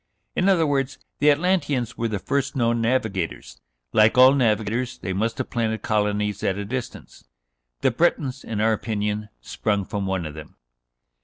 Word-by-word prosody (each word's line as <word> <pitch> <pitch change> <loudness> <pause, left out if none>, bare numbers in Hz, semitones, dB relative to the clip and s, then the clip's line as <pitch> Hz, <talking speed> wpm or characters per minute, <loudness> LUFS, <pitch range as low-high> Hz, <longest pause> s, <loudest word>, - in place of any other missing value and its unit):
In 185 - +2
other 175 -4 +4
words, 135 -2 0 0.2
the 150 - +5
Atlanteans 145 - +1
were 115 - -1
the 105 -2 -2
first 140 +7 -2
known 115 -2 +1
navigators. 95 - -2 0.3
Like 110 +2 +5
all 130 +1 +8
navigators, 115 -1 0
they 95 - -4
must 110 +4 -1
have - - -4
planted 110 -2 -1
colonies 105 -1 0
at 95 - 0
a 100 - -4
distance. 130 +3 -6 0.6
The - - +3
Bretons, 135 -1 0
in 110 -2 -3
our 110 +1 +3
opinion, 105 -1 -2
sprung 100 - -1
from 100 0 -3
one 95 -3 -1
of 75 - -6
them." 75 -1 -11
110 Hz, 165 wpm, -23 LUFS, 105-130 Hz, 0.6 s, all